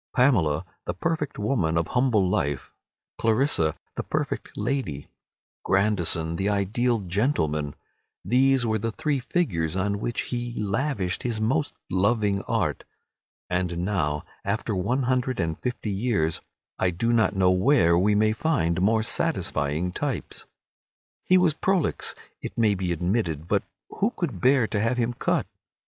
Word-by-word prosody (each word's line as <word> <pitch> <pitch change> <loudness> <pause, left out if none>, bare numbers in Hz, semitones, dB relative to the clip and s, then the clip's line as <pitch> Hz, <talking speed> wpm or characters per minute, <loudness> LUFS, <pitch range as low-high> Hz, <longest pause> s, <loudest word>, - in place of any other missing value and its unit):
Pamela, 95 - +3 0.2
the 90 - -3
perfect 155 - -2
woman 105 -7 0
of 85 - 0
humble 125 -7 +2
life, 70 -6 -1 0.5
Clarissa, 110 - +2 0.2
the - - -1
perfect - - -3
lady, 120 - -2 0.5
Grandison 85 -5 +1
the 95 +3 0
ideal 110 +4 +1
gentleman—these 105 - 0
were 110 -1 +1
the 115 +2 -2
three 145 +4 -1
figures 95 - -1
on 100 +1 0
which 120 +2 -2
he 120 -1 -4
lavished 105 -2 -1
his 115 -3 -2
most 140 +7 0 0.2
loving 100 +1 +2
art. - - -1 0.6
And 90 -1 -1
now, 75 -7 -1 0.2
after 110 +2 -1
one 120 +9 0
hundred 130 0 0
and 80 -1 -1
fifty 120 -4 -3
years, 100 -6 0 0.4
I 95 - +3
do 115 +7 0
not 110 -3 +3
know 95 -1 +4
where 95 -2 +4
we 100 +4 +3
may 110 +1 +3
find 110 - 0
more 110 +3 +3
satisfying 80 -6 0
types. - - -4 0.8
He 185 - +5
was 180 -4 +4
prolix, 185 +1 0 0.3
it - - -7
may 110 -3 +4
be 95 -2 -2
admitted, 85 -2 -1
but - - +2 0.3
who 205 - +1
could 130 - -3
bear 130 0 +4
to 105 -1 -2
have 115 +3 +1
him 120 0 0
cut? - - 0
105 Hz, 140 wpm, -25 LUFS, 90-125 Hz, 0.8 s, He